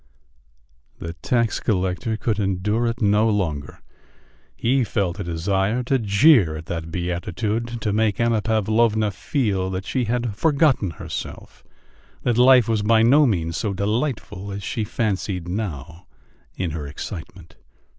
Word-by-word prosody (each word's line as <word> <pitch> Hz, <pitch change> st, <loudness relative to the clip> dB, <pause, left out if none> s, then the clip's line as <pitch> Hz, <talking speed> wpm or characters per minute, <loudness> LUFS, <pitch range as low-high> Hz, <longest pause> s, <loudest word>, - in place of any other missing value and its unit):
The 85 Hz, 0 st, -6 dB
tax 115 Hz, +5 st, 0 dB
collector 95 Hz, +2 st, -1 dB
could 110 Hz, -2 st, -1 dB
endure 105 Hz, +4 st, 0 dB
it 115 Hz, 0 st, -2 dB
no 105 Hz, +2 st, +3 dB
longer; 80 Hz, -10 st, -2 dB, 0.7 s
he 130 Hz, +2 st, +1 dB
felt 100 Hz, -4 st, -2 dB
a -, -, -2 dB
desire 95 Hz, +7 st, 0 dB
to 130 Hz, +2 st, +1 dB
jeer 105 Hz, -, +4 dB
at 80 Hz, -, -9 dB
that 80 Hz, -1 st, -5 dB
beatitude, 100 Hz, +7 st, -3 dB
to 105 Hz, -, -1 dB
make 110 Hz, -1 st, +1 dB
Anna 115 Hz, -2 st, +2 dB
Pavlovna 110 Hz, 0 st, +1 dB
feel 100 Hz, -4 st, -1 dB
that 95 Hz, +1 st, -4 dB
she 130 Hz, -2 st, -1 dB
had 120 Hz, -2 st, -2 dB
forgotten 140 Hz, -, +2 dB
herself, 80 Hz, -, -8 dB, 0.6 s
that 120 Hz, -1 st, +1 dB
life 125 Hz, -2 st, +6 dB
was 110 Hz, -2 st, +1 dB
by 110 Hz, +1 st, +4 dB
no 140 Hz, +5 st, +5 dB
means 85 Hz, -7 st, -1 dB
so 100 Hz, -3 st, -2 dB
delightful 105 Hz, -2 st, -2 dB
as 100 Hz, 0 st, -6 dB
she 110 Hz, -, -2 dB
fancied 100 Hz, -5 st, -2 dB
now 90 Hz, -3 st, -5 dB, 0.5 s
in 90 Hz, -4 st, -2 dB
her 75 Hz, -2 st, -5 dB
excitement.... 85 Hz, +3 st, -9 dB
105 Hz, 140 wpm, -22 LUFS, 90-115 Hz, 0.7 s, life